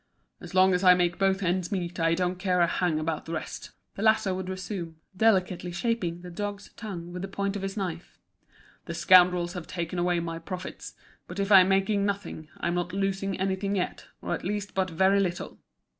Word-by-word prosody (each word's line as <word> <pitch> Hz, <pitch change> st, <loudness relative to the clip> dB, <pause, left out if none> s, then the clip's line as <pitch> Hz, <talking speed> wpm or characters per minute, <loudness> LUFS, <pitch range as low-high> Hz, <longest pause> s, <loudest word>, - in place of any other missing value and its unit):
"As -, -, -10 dB
long 185 Hz, 0 st, +6 dB
as 180 Hz, +1 st, +1 dB
I 180 Hz, -1 st, +8 dB
make 175 Hz, 0 st, 0 dB
both 195 Hz, 0 st, +2 dB
ends 180 Hz, +1 st, 0 dB
meet 180 Hz, -3 st, -3 dB
I 165 Hz, 0 st, +3 dB
don't 180 Hz, 0 st, -1 dB
care 185 Hz, -2 st, +1 dB
a -, -, +6 dB
hang 170 Hz, -1 st, 0 dB
about 155 Hz, 0 st, -2 dB
the 165 Hz, -, -5 dB
rest," 160 Hz, -, -5 dB, 0.2 s
the -, -, -7 dB
latter 220 Hz, -3 st, +3 dB
would 185 Hz, 0 st, -4 dB
resume, 185 Hz, -3 st, -5 dB, 0.2 s
delicately 185 Hz, -4 st, +2 dB
shaping 175 Hz, -3 st, -2 dB
the 180 Hz, -, -8 dB
dog's 205 Hz, +2 st, -5 dB
tongue 175 Hz, -5 st, -7 dB
with 180 Hz, -, -5 dB
the 195 Hz, -, -3 dB
point 200 Hz, +1 st, -2 dB
of 200 Hz, -, -3 dB
his 195 Hz, +1 st, -4 dB
knife. 175 Hz, -4 st, -5 dB, 0.7 s
"The 170 Hz, -, -5 dB
scoundrels 175 Hz, 0 st, +5 dB
have 180 Hz, -3 st, -7 dB
taken 175 Hz, 0 st, -3 dB
away 175 Hz, 0 st, +1 dB
my 165 Hz, -1 st, -4 dB
profits; 185 Hz, +2 st, -7 dB, 0.3 s
but 175 Hz, -, -8 dB
if 200 Hz, +1 st, -1 dB
I'm 190 Hz, -1 st, +8 dB
making 195 Hz, +1 st, +2 dB
nothing 200 Hz, -6 st, -3 dB
I'm 170 Hz, -, -1 dB
not 175 Hz, 0 st, -2 dB
losing 195 Hz, -1 st, -1 dB
anything 195 Hz, +1 st, -1 dB
yet, 180 Hz, -, -3 dB, 0.2 s
or -, -, -2 dB
at -, -, -4 dB
least 205 Hz, +1 st, -3 dB
but 190 Hz, -1 st, 0 dB
very 190 Hz, +4 st, +3 dB
little. 180 Hz, -3 st, -2 dB
185 Hz, 205 wpm, -27 LUFS, 175-195 Hz, 0.7 s, I